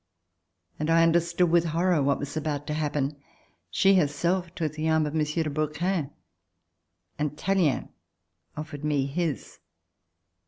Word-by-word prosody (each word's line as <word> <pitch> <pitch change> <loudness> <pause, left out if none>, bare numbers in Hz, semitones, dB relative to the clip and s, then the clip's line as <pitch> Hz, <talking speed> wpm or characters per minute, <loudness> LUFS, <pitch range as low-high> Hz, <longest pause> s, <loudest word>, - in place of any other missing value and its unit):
and 155 +1 -1
I 165 0 +5
under 165 +1 +5
stood 170 0 0
with 170 -1 +5
horror 170 0 +2
what 140 0 +2
was 145 +1 -6
about 150 -2 -2
to 150 - -3
happen. 150 -2 -1 0.5
She 195 0 +4
herself 170 +3 0
took 155 -3 -2
the 155 +1 -1
arm 160 -1 +3
of 150 - -4
M. 155 -1 +2
de 155 +2 -1
Brouquens 155 +2 -1 1.1
and 150 0 -2
Tallien 185 -7 +1 0.7
offered 155 -1 -6
me 145 -3 +1
his. 155 0 -3
155 Hz, 145 wpm, -27 LUFS, 150-170 Hz, 1.1 s, I